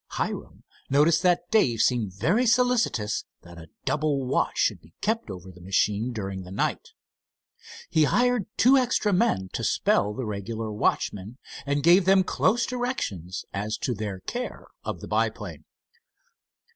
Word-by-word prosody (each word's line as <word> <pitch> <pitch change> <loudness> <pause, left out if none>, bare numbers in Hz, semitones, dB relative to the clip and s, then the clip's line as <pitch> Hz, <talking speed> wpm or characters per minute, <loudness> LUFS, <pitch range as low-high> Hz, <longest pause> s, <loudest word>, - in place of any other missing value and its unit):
Hiram - - -4 0.3
noticed 150 +4 +4
that 175 0 +1
Dave 130 - +3
seemed 115 -6 +2
very 210 - +2
solicitous 235 - +2 0.2
that 85 0 -12
a 80 -1 -12 0.2
double 145 -3 0
watch 125 - 0
should - - +1
be 80 +2 -21
kept 220 - -1
over 95 -1 -8
the 90 0 -16
machine 105 +5 0
during 95 -4 -5
the 90 - -10
night. 95 - -2 0.9
He 160 -2 +3
hired 245 +2 +2
two 255 +5 +6
extra 245 -5 +1
men 105 - +1
to - - -3
spell 105 +1 +1
the 130 - -4
regular 110 +2 -4
watchmen, 105 +1 -1 0.3
and 140 0 0
gave 175 +3 +6
them 190 0 +5
close 240 +5 +1
directions 175 - -3
as 105 +2 -2
to 125 - -2
their 100 -3 -5
care - - -5 0.2
of - - -5
the - - -7
biplane. 105 -8 -2
120 Hz, 150 wpm, -26 LUFS, -, 0.9 s, two